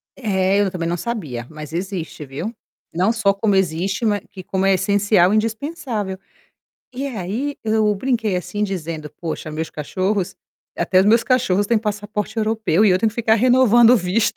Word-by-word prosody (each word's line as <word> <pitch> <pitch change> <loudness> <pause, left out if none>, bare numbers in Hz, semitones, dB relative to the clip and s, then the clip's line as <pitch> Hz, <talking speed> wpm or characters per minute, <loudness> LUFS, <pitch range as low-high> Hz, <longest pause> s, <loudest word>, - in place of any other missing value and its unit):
É, 195 -5 +1
eu 200 - +1
também 170 -3 -3
não 175 +1 -1
sabia, 155 - -4
mas 155 -1 -9
existe, 175 -4 -4
viu. 145 - -5 0.4
Não 185 +6 +2
só 215 -4 +2
como 200 0 +1
existe, 190 +4 0
mas 205 -2 +1
que 190 -2 -10
como 190 +1 -1
é 195 - +4
essencial 200 -1 +3
e - - +3
indispensável. 225 - -2 0.8
E 270 +3 -3
aí, 240 +4 -3
eu 215 -1 +2
brinquei 225 -2 -1
assim 205 +4 -2
dizendo: 165 -6 -5
"Poxa, 160 -2 -4
meus 160 +1 -4
cachorros 185 +6 -2 0.4
até 185 -1 +3
os - - +3
meus 230 +2 +4
cachorros 230 -7 +2
têm 230 +2 +2
passaporte 210 0 -3
europeu 220 -4 +1
e 210 - +5
eu 180 - +3
tenho 220 +3 +2
que - - -17
ficar 225 -1 +2
renovando 240 0 +5
o 250 - +7
visto". 195 +3 0
205 Hz, 180 wpm, -20 LUFS, 180-225 Hz, 0.8 s, o